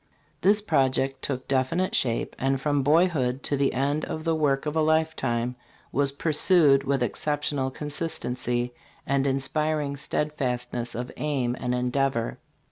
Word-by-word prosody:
This 205 Hz, +2 st, +4 dB
project 135 Hz, -5 st, +1 dB
took 130 Hz, -2 st, -3 dB
definite 140 Hz, +8 st, 0 dB
shape, 115 Hz, -3 st, +1 dB
and 135 Hz, 0 st, +1 dB
from 145 Hz, 0 st, +1 dB
boyhood 145 Hz, -4 st, +2 dB
to 145 Hz, -, 0 dB
the 140 Hz, 0 st, +2 dB
end 140 Hz, +4 st, 0 dB
the 160 Hz, +1 st, -1 dB
work 145 Hz, -3 st, +1 dB
of 150 Hz, +1 st, -2 dB
a 160 Hz, -, +3 dB
lifetime 135 Hz, -7 st, 0 dB, 0.4 s
was 140 Hz, +1 st, +2 dB
pursued 150 Hz, -1 st, +4 dB
with 135 Hz, -2 st, 0 dB
exceptional 145 Hz, +2 st, -1 dB
consistency 125 Hz, -5 st, -2 dB, 0.3 s
and 140 Hz, 0 st, +1 dB
inspiring 145 Hz, +2 st, 0 dB
steadfastness 125 Hz, -5 st, -2 dB
of 125 Hz, +2 st, -4 dB
aim 135 Hz, -5 st, -1 dB
and 125 Hz, -1 st, -1 dB
endeavor. 125 Hz, -1 st, -1 dB
140 Hz, 130 wpm, -26 LUFS, 130-150 Hz, 0.4 s, This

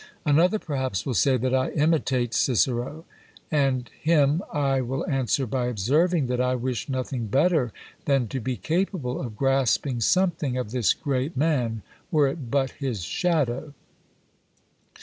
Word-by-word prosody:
Another 165 Hz, +7 st, +4 dB
perhaps 130 Hz, -, -3 dB
will 130 Hz, -, -1 dB
say 130 Hz, +7 st, +3 dB
that 130 Hz, +2 st, -1 dB
I 130 Hz, 0 st, +2 dB
imitate 140 Hz, -6 st, +1 dB
Cicero. 130 Hz, +5 st, 0 dB, 0.5 s
And 135 Hz, -5 st, +1 dB
him 155 Hz, 0 st, +3 dB
I 135 Hz, -2 st, +1 dB
will 130 Hz, +2 st, -3 dB
answer 135 Hz, 0 st, 0 dB
by 125 Hz, +1 st, -1 dB
observing, 145 Hz, -, +1 dB
that 125 Hz, 0 st, -1 dB
I 125 Hz, 0 st, +1 dB
wish 125 Hz, 0 st, -3 dB
nothing 130 Hz, -3 st, -3 dB
better 140 Hz, -, +2 dB, 0.3 s
than 135 Hz, -4 st, +2 dB
to 135 Hz, -, -3 dB
be 125 Hz, +1 st, -3 dB
capable 155 Hz, -, -2 dB
of 115 Hz, -5 st, -6 dB
grasping 135 Hz, -1 st, +1 dB
something 165 Hz, -, +1 dB
of 125 Hz, -4 st, -3 dB
this 120 Hz, -7 st, +2 dB
great 140 Hz, 0 st, -2 dB
man, 125 Hz, -8 st, 0 dB, 0.3 s
were 150 Hz, -5 st, +3 dB
it 135 Hz, -3 st, -5 dB
but 135 Hz, 0 st, +1 dB
his 125 Hz, -, -4 dB
shadow! 150 Hz, -, -1 dB
135 Hz, 145 wpm, -25 LUFS, 125-150 Hz, 0.5 s, Another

